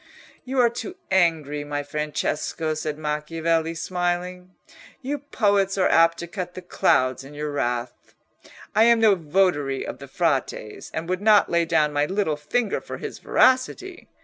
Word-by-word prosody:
"You 265 +1 -4
are 245 -2 +5
too 300 +10 -6 0.2
angry, 160 -6 +1
my 145 0 -3
Francesco," 150 +2 -2
said 155 -1 -4
Macchiavelli, 160 +2 -1
smiling; 180 +1 -3 0.5
"you 285 +3 -2
poets 200 -8 +1
are 185 - +3
apt 165 0 +4
to 170 - -6
cut 180 -1 -6
the 185 - -8
clouds 130 -6 +1
in 140 +2 -12
your 150 0 -4
wrath. 120 -3 -3 0.6
I 220 - +5
am 235 -1 +5
no 220 -2 +5
votary 155 -5 0
of - - -7
the 140 - -10
Frate's, 135 - -2
and 160 +1 -4
would 185 +1 -2
not 210 -1 +5
lay 170 0 +2
down 155 -2 +2
my 145 0 +1
little 190 -5 0
finger 195 +9 -1
for - - -7
his - - -7
veracity. 355 +9 +1
165 Hz, 160 wpm, -24 LUFS, 150-195 Hz, 0.6 s, are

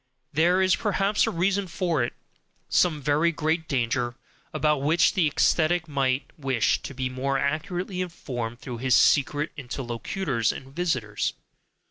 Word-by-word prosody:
There 175 +5 +3
is 185 0 +4
perhaps 205 0 +1
a - - +2
reason 190 +3 0
for 170 -4 0
it, 120 - -3 0.6
some 155 -5 +2
very 150 +4 +3
great 160 0 -1
danger, 120 -2 -1 0.4
about 150 -2 +1
which 160 +4 +3
the 175 -5 +3
ascetic 170 +1 +2
might 135 -2 -1
wish 135 -5 +1
to 135 - -8
be 130 0 -1
more 135 +2 -1
accurately 180 +6 -2
informed 120 -10 -5
through 125 -4 -7
his 130 0 +3
secret 145 +6 +3
interlocutors 125 - -2
and 135 +1 -10
visitors? 130 -12 -1
150 Hz, 140 wpm, -26 LUFS, 130-175 Hz, 0.6 s, is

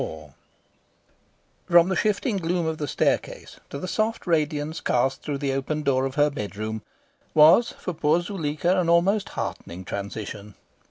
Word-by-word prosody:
XXIV 75 -3 -7 1.4
From 170 +1 +6
the 190 - 0
shifting 210 +3 0
gloom 175 -1 -1
of 160 -1 -2
the 150 - -2
stair - - +2
case - - -12
to - - -6
the 185 - -5
soft 220 +4 -1
radiance 155 -2 0
cast 130 +2 +1
through 145 -2 -3
the 135 -1 -1
open 150 +3 -2
door 135 -2 +2
of 135 - -8
her 145 0 +3
bedroom 110 -3 -5 0.5
was 165 +10 +6
for 180 - -4
poor 155 +1 +2
Zuleika 175 -1 -1
an 170 -2 +1
almost 195 +5 +3
heartening 90 +2 -6
transition. 100 +1 -6
150 Hz, 160 wpm, -25 LUFS, 130-175 Hz, 1.4 s, From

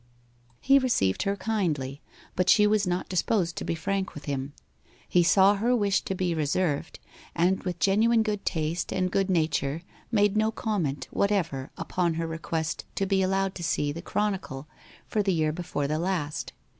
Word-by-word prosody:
He 275 +1 +5
received 235 - +1
her 200 0 0
kindly; 165 -10 -2 0.3
but 185 0 +1
she 210 -1 +6
was 210 -2 +2
not 180 +1 -1
disposed 185 -1 0
to - - -3
be - - -2
frank 190 +3 -2
with 150 - -9
him. 140 0 -3 0.5
He 180 - +4
saw 190 +3 +5
her 240 +5 +2
wish 200 -4 +2
to 190 - -2
be 180 -2 0
reserved, 155 0 -1 0.4
and 180 +3 +2
with 180 -2 -3
genuine 220 +5 +3
good 210 -2 -2
taste 160 +1 -2
and 185 -1 0
good 195 0 +1
nature 160 -3 0 0.3
made 205 -2 +3
no 215 +1 +3
comment 185 - -2
whatever 170 -10 0
upon 175 -3 -1
her 165 0 -2
request 160 0 -3
to 195 - 0
be 195 0 +2
allowed 195 0 +1
to 175 - -7
see 145 -3 0
the 165 +3 -6
Chronicle 190 -9 -2 0.4
for 215 - 0
the 195 -2 +1
year 155 -2 +1
before 155 -4 -3
the 155 +2 -1
last. 170 -4 -2
185 Hz, 175 wpm, -27 LUFS, 160-200 Hz, 0.5 s, she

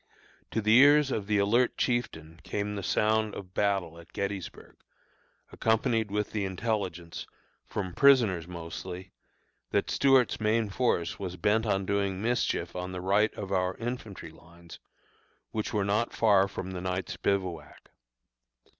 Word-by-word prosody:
To 110 - -1
the 110 +1 +5
ears 145 0 +6
of 100 -5 -2
the 105 -1 +2
alert 115 +5 +2
chieftain 85 - -2
came 105 0 -3
the 100 - -4
sound 110 +3 +1
of 90 -2 -9
battle 95 -5 0
at 85 0 -16
Gettysburg, 100 -2 -5 0.7
accompanied 110 -1 +1
with 105 +1 -2
the 105 -2 -2
intelligence, 95 -3 -3 0.4
from 95 -3 -4
prisoners 115 - +4
mostly, 90 +2 -7 0.6
that - - 0
Stuart's 135 -3 +3
main 110 -1 +1
force 100 -7 0
was 90 -2 -5
bent 110 +6 +1
on 95 -2 0
doing 100 -1 -1
mischief 120 +3 -1
on 90 0 -4
the 90 - -4
right 100 +4 +2
of 100 -1 -6
our 90 -1 0
infantry 115 -8 -6
lines, 85 +1 -15 0.7
which 110 -1 -3
were 105 -2 0
not 105 +4 0
far 100 -3 +4
from 95 -1 -6
the 90 -1 -5
night's 95 0 -3
bivouac. 90 -6 -3
100 Hz, 145 wpm, -29 LUFS, 90-110 Hz, 0.7 s, ears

